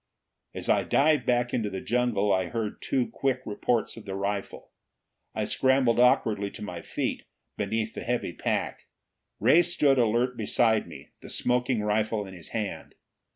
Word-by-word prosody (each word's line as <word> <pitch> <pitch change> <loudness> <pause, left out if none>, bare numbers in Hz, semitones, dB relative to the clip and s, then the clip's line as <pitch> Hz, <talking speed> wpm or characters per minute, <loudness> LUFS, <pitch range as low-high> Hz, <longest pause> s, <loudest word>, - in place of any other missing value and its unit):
As - - -5
I - - +4
dived 150 +2 +2
back 120 0 +1
into 110 -4 0
the 95 - -5
jungle, 115 -3 +1
I 95 -1 +1
heard 110 +1 -4
two 125 -4 0
quick 130 0 -1
reports 110 +2 -1
of 115 - -10
the 95 -2 -5
rifle. 100 0 -4 0.6
I - - -1
scrambled 130 -3 +2
awkwardly 105 -4 +3
to 105 - -8
my 90 -5 -6
feet, - - -3 0.3
beneath 110 +2 -2
the - - -6
heavy 120 -7 -2
pack. - - -2 0.5
Ray 130 - +6
stood 150 -6 +2
alert 120 +2 +2
beside 110 0 +2
me, - - -12
the - - -11
smoking 125 -1 0
rifle 105 0 0
in 95 - -10
his 90 -2 -11
hand. 110 -3 -5
115 Hz, 160 wpm, -27 LUFS, 105-125 Hz, 0.6 s, Ray